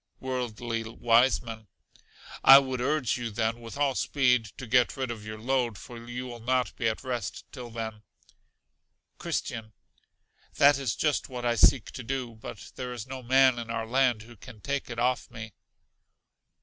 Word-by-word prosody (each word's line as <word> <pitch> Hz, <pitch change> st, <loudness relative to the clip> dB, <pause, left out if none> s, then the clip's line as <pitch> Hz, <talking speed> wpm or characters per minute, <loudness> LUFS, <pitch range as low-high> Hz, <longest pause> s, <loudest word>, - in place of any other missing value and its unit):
Worldly 120 Hz, -3 st, -3 dB
Wiseman. 115 Hz, -1 st, +1 dB, 0.8 s
I 135 Hz, -, +11 dB
would 130 Hz, -2 st, 0 dB
urge 130 Hz, -3 st, 0 dB
you 120 Hz, -1 st, -3 dB
then, 115 Hz, +2 st, -1 dB
with 115 Hz, +3 st, -9 dB
all 140 Hz, -2 st, +2 dB
speed, 125 Hz, -3 st, +2 dB
to 130 Hz, -, -7 dB
get 125 Hz, +3 st, +2 dB
rid 130 Hz, -2 st, -2 dB
of 110 Hz, -3 st, -7 dB
your 110 Hz, 0 st, -7 dB
load; 120 Hz, -1 st, 0 dB
for 115 Hz, +2 st, -10 dB
you 120 Hz, +2 st, -6 dB
will 120 Hz, -2 st, -8 dB
not 125 Hz, +2 st, 0 dB
be 115 Hz, -, -1 dB
at 110 Hz, -, -5 dB
rest 120 Hz, -5 st, -4 dB
till 125 Hz, -3 st, -8 dB
then. 110 Hz, -2 st, -6 dB, 1.2 s
Christian. 110 Hz, -1 st, -4 dB, 0.8 s
That 140 Hz, -1 st, +6 dB
is 130 Hz, -6 st, -1 dB
just 150 Hz, -2 st, 0 dB
what 125 Hz, -2 st, -5 dB
I 120 Hz, -, +3 dB
seek 120 Hz, +1 st, +4 dB
to 125 Hz, -, -7 dB
do. 125 Hz, -1 st, -3 dB
But 110 Hz, -1 st, -10 dB
there 125 Hz, -1 st, -4 dB
is 120 Hz, -3 st, -6 dB
no 130 Hz, 0 st, -7 dB
man 130 Hz, 0 st, +4 dB
in 115 Hz, -1 st, -7 dB
our 115 Hz, 0 st, -2 dB
land 125 Hz, -2 st, +2 dB
who 120 Hz, +1 st, -14 dB
can 110 Hz, +1 st, -13 dB
take 140 Hz, +5 st, -3 dB
if 115 Hz, -, -6 dB
off 125 Hz, +1 st, 0 dB
me. 115 Hz, -2 st, -9 dB
120 Hz, 175 wpm, -28 LUFS, 115-130 Hz, 1.2 s, I